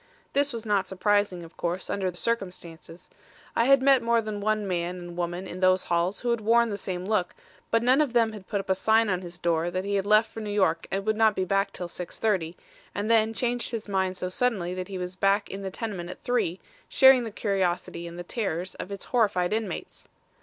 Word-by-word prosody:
This 285 +1 +2
was 230 -2 -6
not 205 -3 +1
surprising, 200 -2 +1
of 165 - -13
course, 175 +2 -2
under 190 -2 -1
the 175 - -8
circumstances. 180 -6 -4 0.5
I 230 - +3
had 275 0 +5
met 270 -2 +5
more 235 0 +2
than 215 -2 -4
one 215 0 0
man 180 0 -2
and 175 -1 -8
woman 175 +1 -3
in 185 -1 -7
those 185 0 +4
halls 175 +3 0
who 240 - 0
had 235 -2 0
worn 230 +1 +3
the - - -2
same 180 -1 -4
look; 200 -4 0 0.3
but 230 0 +2
none 255 +4 +5
of 280 -5 0
them 230 -2 +3
had 205 -3 -10
put 200 - -1
up 195 - -3
a - - +6
sign 220 +3 +3
on 180 0 -1
his 175 -1 -8
door 170 -1 0
that 185 +2 -3
he 200 - -2
had 200 0 0
left 215 +1 +4
for - - -7
New 215 -1 -5
York 190 -5 +1
and 195 +1 -2
would 215 0 +1
not 220 -2 +4
be 185 - 0
back 195 +1 +1
till 180 - -5
6:30, 180 -1 -2 0.4
and 210 +3 -1
then 225 -1 +4
changed 240 +1 -1
his 225 -2 -5
mind 190 -2 0
so 180 - -2
suddenly 185 -3 0
that 185 0 -5
he 195 -2 -5
was 180 0 -5
back 195 +2 +1
in 195 - -6
the 195 - -4
tenement 190 -4 -5
at - - -10
three, 240 -8 0 0.3
sharing 265 -2 +7
the 230 - -4
curiosity 185 -5 -2
and 170 0 -9
the 175 - -5
terrors 185 -3 -3
of 200 - -8
its 200 - -6
horrified 210 -6 +1
inmates. 215 -5 -4
195 Hz, 230 wpm, -27 LUFS, 180-225 Hz, 0.5 s, sharing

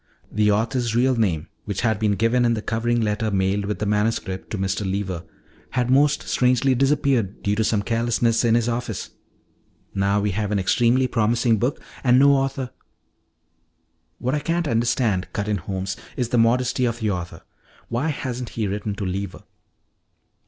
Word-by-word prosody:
The 105 0 +2
author's 115 +2 0
real 130 +2 +3
name, 90 -8 0 0.2
which 100 -3 -3
had 110 -3 +1
been 105 -2 +2
given 115 +4 +2
in 120 -1 +3
the 110 - -3
covering 115 +1 0
letter 110 +1 0
mailed 100 0 0
with 105 +1 -2
the 105 - -2
manuscript 105 -2 -1
to 110 - -3
Mr. 95 +2 -1
Lever, 95 -2 -2 0.6
had 125 0 +1
most 145 +2 +3
strangely 125 +1 +3
disappeared, 135 -6 +1
due 100 0 +1
to 110 - +1
some 105 -2 +1
carelessness 115 +1 +1
in 115 -1 +4
his 120 -1 +1
office. 120 -3 -3 0.8
"Now 100 +1 +1
we 105 0 0
have 105 +2 -2
an 105 - +1
extremely 120 +6 +3
promising 115 -1 +2
book 125 +6 0 0.2
and 125 -1 +5
no 140 +2 +6
author 135 -2 -1 0.7
" - - -46
"What 130 +2 -2
I 150 - +1
can't 170 +1 -1
understand," 115 -5 +1
cut 105 - -2
in 105 -1 +1
Holmes, 95 +1 -4 0.2
"is 125 -2 -1
the 120 - +2
modesty 125 +2 +2
of 115 -1 -1
the 110 -2 0
author. 90 -2 -5 0.4
Why 120 +7 -1
hasn't 125 -5 -3
he 110 - -3
written 100 +1 -3
to 100 - -4
Lever?" 95 +1 -4
115 Hz, 175 wpm, -23 LUFS, 100-125 Hz, 0.8 s, no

